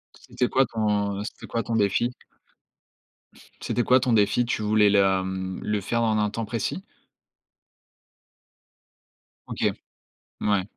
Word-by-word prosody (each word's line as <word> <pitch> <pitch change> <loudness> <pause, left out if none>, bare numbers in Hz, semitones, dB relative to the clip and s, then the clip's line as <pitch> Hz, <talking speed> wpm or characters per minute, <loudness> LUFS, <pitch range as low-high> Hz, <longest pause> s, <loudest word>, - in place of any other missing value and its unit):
C'était 125 - -2
quoi 135 0 +3
ton 105 -3 -1
c'était - - -9
quoi 115 - -2
ton 115 - -2
défi? 105 +3 +2 1.5
C'était 120 - -1
quoi 130 +1 +5
ton 125 -1 0
défi? 110 +3 +3
Tu 115 - -2
voulais 105 -1 +4
la, 95 -2 +3
mmh 95 0 -4
le 105 -1 -1
faire 115 +4 -1
en 110 -1 +2
un 105 0 +1
temps 115 +1 -4
précis? 115 0 -3 2.6
OK. - - 0 0.7
Mouais. 100 -3 +1
105 Hz, 130 wpm, -25 LUFS, 100-115 Hz, 2.6 s, quoi